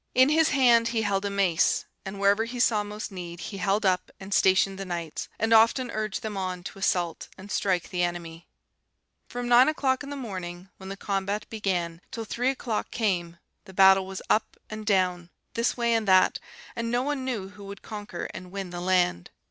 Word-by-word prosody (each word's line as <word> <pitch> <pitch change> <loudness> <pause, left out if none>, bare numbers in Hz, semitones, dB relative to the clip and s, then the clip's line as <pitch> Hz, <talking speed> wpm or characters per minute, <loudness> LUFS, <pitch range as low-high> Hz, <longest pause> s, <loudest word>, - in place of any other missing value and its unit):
In 260 +2 +6
his 315 +1 +4
hand 240 -4 +4
he 230 -1 0
held 200 -1 0
a - - 0
mace, 195 -5 +2 0.2
and 195 +1 -6
wherever 200 +3 +3
he 245 +1 -6
saw 220 -3 +3
most 210 +1 -6
need 175 -2 -7
he 200 - -6
held 200 +3 0
up 185 -1 +1
and 195 +1 -6
stationed 190 +1 +3
the - - -3
knights, 170 -4 -5
and 225 +1 +1
often 230 +2 +4
urged 215 -2 -3
them 215 -2 -4
on 185 -2 -3
to 195 - -8
assault 175 -4 0
and 195 +1 -10
strike 185 -4 0
the 180 - -1
enemy. 170 -1 -4 0.8
"From 245 0 -5
nine 245 +1 +7
o'clock 265 -4 0
in 285 - -7
the 285 - -5
morning, 185 -7 -6
when 190 0 -9
the 195 - -6
combat 200 +1 -2
began, 180 -6 -2
till 225 -1 -5
three 245 +4 0
o'clock 245 -5 -2
came, 175 -7 -1 0.3
the 190 - -13
battle 190 0 +6
was 190 -1 -6
up 215 - +1
and 215 0 -7
down, 180 -4 +1 0.2
this 230 +2 0
way 235 -1 +2
and 225 -2 0
that, 185 -1 +5 0.4
and 230 -1 -2
no 245 +1 +1
one 285 -1 -2
knew 225 -7 -3
who 200 0 -12
would 200 0 -9
conquer 205 -5 -6
and 185 - -8
win 195 -2 -5
the 175 0 -5
land. 180 - +1
200 Hz, 205 wpm, -27 LUFS, 185-230 Hz, 0.8 s, nine